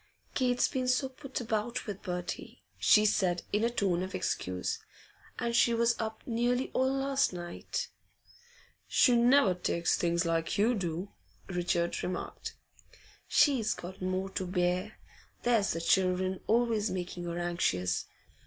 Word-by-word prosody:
'Kate's 250 -2 +2
been 255 -2 -2
so 255 +2 +2
put 265 +1 -6
about 225 0 -2
with 205 -3 -6
Bertie,' 180 -2 -5 0.2
she 210 0 +6
said, 180 -4 +2
in 210 +2 +2
a 235 - +3
tone 195 -7 0
of 185 0 -4
excuse. 90 0 -2 0.6
'And 235 -1 -1
she 235 0 +4
was 235 +1 +3
up 220 0 -4
nearly 245 +2 0
all 260 +1 +2
last 275 -3 +1
night.' 175 -1 -4 1.0
'She 245 - +5
never 240 -3 +5
takes 175 -1 0
things 170 0 +1
like 165 0 0
you 220 +5 +3
do,' 180 -2 -3 0.4
Richard 175 -1 0
remarked. 180 0 -5 0.7
'She's 250 -8 +3
got 185 +2 -9
more 185 +1 -2
to 190 -1 -3
bear. 180 +3 0 0.5
There's 230 -4 +2
the 165 - -3
children 185 +1 +2
always 225 -2 +2
making 180 -1 -4
her 170 0 -3
anxious. 90 - 0
195 Hz, 140 wpm, -31 LUFS, 175-235 Hz, 1.0 s, she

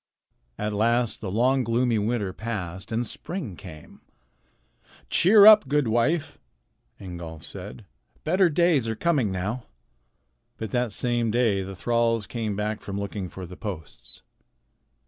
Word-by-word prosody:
At 105 0 -2
last 115 +2 +1
the 100 - -4
long, 125 +6 +2
gloomy 115 0 +1
winter 105 -3 -1
passed 95 -5 -5
and 115 +2 0
spring 135 - -5
came. 80 -5 -12 1.1
"Cheer 200 +3 +6
up, 215 -7 +9
good 145 -1 +1
wife," 120 +8 0 0.6
Ingolf 85 -4 -8
said. 100 +3 -8 0.4
"Better 180 +3 +3
days 160 -7 +2
are 110 - -2
coming 135 - +1
now." 105 +7 -3 0.9
But 110 -3 -5
that 125 -2 0
same 120 +1 0
day 110 -4 +2
the 95 0 -7
thralls 115 +1 +1
came 110 -1 -3
back 105 +1 -3
from 100 0 -5
looking 100 -2 -4
for 95 +1 -8
the 90 +1 -10
posts. 90 -9 -8
110 Hz, 135 wpm, -25 LUFS, 100-125 Hz, 1.1 s, up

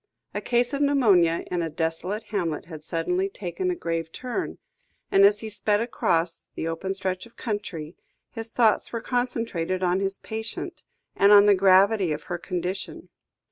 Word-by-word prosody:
A - - -3
case 240 +2 +1
of 280 - -1
pneumonia 205 - +4
in 175 -1 0
a 165 - -2
desolate 165 +6 -2
hamlet 165 -8 -1
had 160 -3 -10
suddenly 180 +4 -1
taken 200 - -3
a 360 - 0
grave 165 - -3
turn, 255 - -4 0.5
and 195 - +6
as 205 +1 +4
he 220 - -5
sped 205 0 +1
across 170 -7 0
the 160 - -3
open 190 +4 -3
stretch 185 +2 -3
of 230 - -24
country, 190 -8 -4 0.4
his 225 0 -7
thoughts 225 -2 +2
were 230 - -2
concentrated 230 -8 -1
on 180 +1 +2
his 195 0 -1
patient, 220 0 -6 0.3
and 200 +1 +5
on 205 0 +9
the 205 - +7
gravity 195 0 +4
of 150 - -6
her 175 -1 -4
condition. 180 +1 -4
195 Hz, 170 wpm, -25 LUFS, 170-220 Hz, 0.5 s, on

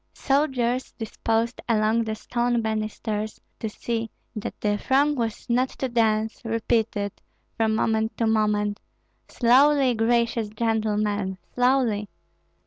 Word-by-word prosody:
Soldiers 260 -3 0
disposed 225 +1 -2
along 225 +1 +2
the 220 0 -2
stone 240 +1 0
banisters 215 0 -3 0.2
to 220 - -3
see 225 +1 -3 0.3
that 215 - -5
the 205 -1 0
throng 280 +2 +3
was 230 -5 -3
not 250 +2 +2
too 265 - -4
dense, 220 -2 +1
repeated, 225 -2 0 0.4
from 220 -1 +1
moment 220 +1 0
to 230 - +1
moment, 210 -2 +1 0.5
"Slowly, 265 +2 +4
gracious 230 -1 +1
gentlemen, 210 -3 0 0.2
slowly!" 245 -5 +2
225 Hz, 115 wpm, -25 LUFS, 215-240 Hz, 0.5 s, Slowly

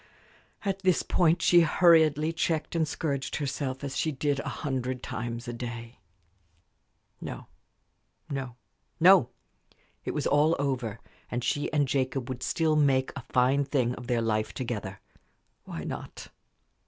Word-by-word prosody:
At 195 -1 -1
this 185 -3 +2
point 170 -1 +2
she 175 -1 +6
hurriedly 160 -1 +4
checked 160 -1 -1
and 160 -2 +2
scourged 140 -3 -2
herself, 135 -2 -3
as 140 -2 -4
she 160 - 0
did 145 0 -1
a - - -3 0.2
hundred 130 -2 -2
times 120 -1 -5
a 120 - -4
day. 115 0 -7 1.2
No, - - -6 0.8
no, 135 -4 -4 0.4
no! - - +7 0.7
It - - -4
was - - -1
all 150 +3 +4
over, 125 -6 -2 0.3
and 120 0 -3
she 145 - -1
and 145 -2 +2
Jacob 130 -1 -1
would 130 -1 -5
still 160 +3 +1
make 135 -3 +3
a 140 - -5
fine 130 +3 +3
thing 130 -3 0
of 125 -1 -9
their 120 -1 +1
life 110 -1 -1
together. 105 -6 -4 0.7
Why - - -6
not? - - -7
135 Hz, 140 wpm, -28 LUFS, 125-155 Hz, 1.2 s, no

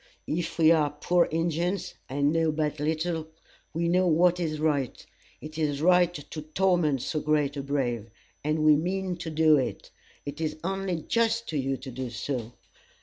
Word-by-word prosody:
If 165 +2 -3
we 160 -1 +6
are 155 -3 +4
poor 170 +4 +2
Injins, 170 +3 -1 0.2
and 140 +3 +1
know 165 -1 +2
but 150 -1 -2
little, 160 +1 -1 0.4
we 170 +1 -1
know 180 +2 +3
what 175 +2 +4
is 155 -3 -2
right. 145 -5 -1 0.4
It 155 +1 -8
is 145 -3 0
right 180 +1 +4
to 155 +1 -7
torment 155 -4 +1
so 155 - -1
great 150 -2 +1
a 140 - -3
brave, 125 -5 -2 0.3
and 155 +1 0
we 155 -1 +7
mean 185 +3 -1
to 170 -1 -5
do 155 -1 +4
it. 130 - -3 0.3
It 145 +3 -6
is 155 -1 -2
only 190 -3 -2
just 230 0 +1
to 155 - -2
you 135 0 -1
to 130 +1 -8
do 130 0 -5
so. 120 0 -4
155 Hz, 175 wpm, -27 LUFS, 145-175 Hz, 0.4 s, we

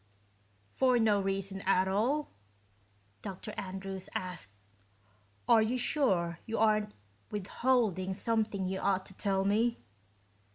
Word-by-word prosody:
"For 250 - +2
no 215 -3 +3
reason 195 0 -2
at 190 0 +3
all?" 245 +10 0 0.9
Dr. 200 +1 -6
Andrews 190 0 -5
asked. 180 - -4 1.0
"Are 225 - +6
you 225 +4 +1
sure 185 - +1
you 225 - -2
aren't 215 -1 +2 0.3
withholding 205 -2 0
something 215 -3 0
you 190 +1 -2
ought 190 -1 +1
to - - -8
tell 195 0 0
me?" 225 +4 +2
200 Hz, 115 wpm, -31 LUFS, 190-225 Hz, 1.0 s, Are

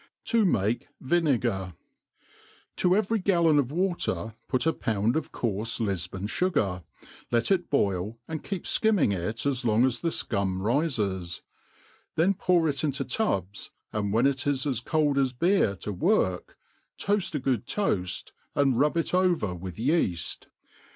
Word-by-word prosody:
7i 230 -4 +3
mahe 110 - 0
Vinegar 125 - 0 0.5
» - - -29
TO 180 0 +3
every 215 +2 +1
gallon 170 -6 +3
of 135 -2 0
water 175 - -1
put 130 +1 0
a 160 - +3
pound 110 +2 0
of 160 -2 -2
coarf*e 115 +1 -2
Lifbon 95 -1 -3
fu 180 - 0
gar,, 95 - -1 0.5
let 120 +8 +1
ii 195 - +6
boil, 100 -4 0
and 160 -2 -5
keep 195 -4 -4
fkimming 205 - +2
it 105 +8 -3
as 135 -3 0
long' 115 +1 +3
as 130 -2 0
the 170 - +1
fcum 100 - -1
rifes;,then 110 - -2
pour 180 -3 +2
it 140 0 -1
into 140 -3 -1
tubs, 100 - -2 0.2
and 100 -2 -1
when 115 +5 +3
it 135 0 +1
is 140 -1 +1
as 130 -6 0
cold 145 +1 +1
as 130 -2 +1
bfeer 165 - +2
to 105 - -4
work, 90 0 0 0.4
t(>aft 200 -5 0
a - - 0
good 125 -3 -1
toaft, 100 - -1 0.2
and 135 -4 +2
rub 150 +3 +2
it 165 - -1
over 180 - +2
with 90 0 -7
yeaft. 110 - -1
130 Hz, 155 wpm, -27 LUFS, 100-165 Hz, 0.5 s, ii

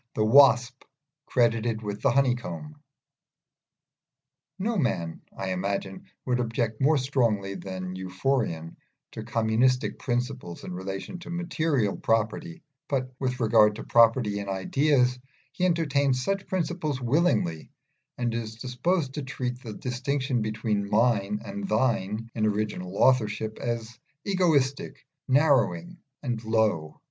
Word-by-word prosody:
THE 110 - +2
WASP 125 0 +5 0.4
CREDITED 115 -2 +1
WITH 105 0 -4
THE - - +3
HONEYCOMB 120 - 0 1.8
No 220 +5 -1
man, 115 - -1 0.2
I 95 -1 -3
imagine, 95 +1 -3 0.2
would 125 -1 +1
object 115 -1 -2
more 150 +3 +4
strongly 115 -8 0
than 95 -1 -6
Euphorion 95 -3 -2 0.3
to - - -7
communistic 115 +4 +1
principles 125 -7 -3
in 90 - -6
relation 95 - -5
to 170 - -11
material 160 - 0
property, 115 +11 -1 0.2
but 130 -2 -2
with 130 -1 -2
regard 110 -2 +5
to - - -7
property 115 -3 +4
in 100 -1 -5
ideas 125 +6 +2 0.3
he 180 - -1
entertains 140 -6 +1
such 195 +6 -2
principles 170 -6 -2
willingly, 125 - +1 0.5
and 120 -1 -1
is 110 -1 -4
disposed 130 +5 -1
to 150 - -3
treat 125 -2 -4
the 110 -4 -7
distinction 130 +1 -1
between 105 -1 -1
Mine 105 -2 +2
and 200 -1 -5
Thine 115 - 0
in 110 -2 +1
original 105 -3 -2
authorship 110 -4 +2
as 115 -1 -4 0.3
egoistic, 160 -9 +1 0.2
narrowing, 160 +5 +2 0.3
and 120 -4 -3
low. 110 -9 0
120 Hz, 120 wpm, -27 LUFS, 105-135 Hz, 1.8 s, WASP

